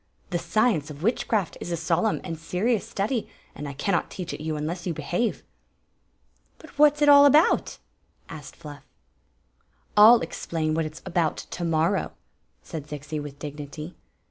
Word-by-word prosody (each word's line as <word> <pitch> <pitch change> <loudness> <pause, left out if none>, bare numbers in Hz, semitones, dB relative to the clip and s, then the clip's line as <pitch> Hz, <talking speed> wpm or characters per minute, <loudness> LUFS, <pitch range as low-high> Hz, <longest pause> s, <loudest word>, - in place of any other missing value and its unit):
The 175 - 0
science 170 - +1
of 150 +1 -9
witchcraft 215 -3 0
is 175 - -5
a 170 - -1
solemn 170 +6 0
and 170 -3 -4
serious 200 +7 -1
study, 215 +4 -2 0.2
and 150 - -7
I 140 - -6
cannot 175 +6 -1
teach 180 -3 -6
it - - -7
you 155 0 -3
unless 165 +4 -4
you 170 - -2
behave." 175 +10 -2 0.5
" - - -42
But 315 - -15
what 295 -1 +7
s 300 - -12
it - - +4
all 285 0 +9
about?" 300 +4 +3 0.5
asked 155 -4 -10
Fluff. 145 -1 -11 0.6
" - - -41
1 210 - +7
11 235 -3 +7
explain 160 -1 -3
what 160 0 0
it 155 - -6
s 155 - -13
about 170 -4 0
to 175 - -6
morrow," 165 +3 0 0.5
said 150 -3 -7
Zixi 150 +1 -5
with 145 -1 -8
dignity. 150 +2 -7
165 Hz, 175 wpm, -25 LUFS, 155-205 Hz, 0.6 s, all